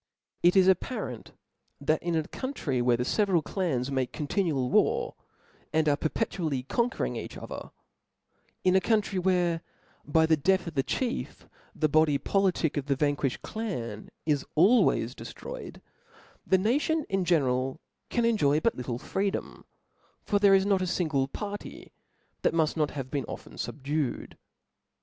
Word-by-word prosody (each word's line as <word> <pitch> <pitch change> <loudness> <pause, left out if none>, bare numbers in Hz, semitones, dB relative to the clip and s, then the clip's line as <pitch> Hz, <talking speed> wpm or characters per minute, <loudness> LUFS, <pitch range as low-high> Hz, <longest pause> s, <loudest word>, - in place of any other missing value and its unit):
It 175 +2 +5
is 190 -1 +6
apparent, 190 - -1 0.5
that 155 +2 +1
in 170 -1 -1
a 160 - +1
country 170 - -2
where 120 -1 +3
the 125 - -1
fe 210 - +2
veral 180 -6 +2
clans 140 -10 -1
make 130 -2 -1
continual 150 -4 0
war^ - - +2 0.6
and 160 0 +2
are 145 - +4
perpetu 180 +7 -2
ally 150 -7 0
conquering 240 - 0
each - - -6
other; - - -7 0.9
in 185 0 +4
a 190 - +5
country, 210 -2 +1
where 175 -2 +1 0.4
by 160 +2 +3
the 160 0 +4
death 185 +5 +2
of 170 - -6
the 135 - +2
chief, 245 - -3 0.3
the 155 - +2
body 155 -1 +3
politic 185 -4 +1
of 145 -1 -2
the 140 - +2
vanquifhed 145 -2 0
clan 120 - -5 0.2
is 145 -3 +1
always 200 +10 +4
deftroyed^ - - -8 0.7
the 190 - +5
nation 285 - +1
in 195 -1 0
general 135 -5 +1 0.3
can 240 -1 +1
enjoy 155 -11 +3
but 230 +8 +2
little 125 -1 -4
freedom: 195 +9 -3 0.6
for 205 - +1
there 200 -1 +6
is 190 0 +3
not 200 -2 +2
a 185 - 0
fingle 155 -7 0
party 205 +8 -7 0.5
that - - +1
muft 160 -2 +2
not 150 -3 +1
have 135 -3 -6
been 140 -4 -1
often - - -9
fubdued. 145 0 -3
165 Hz, 155 wpm, -28 LUFS, 140-195 Hz, 0.9 s, is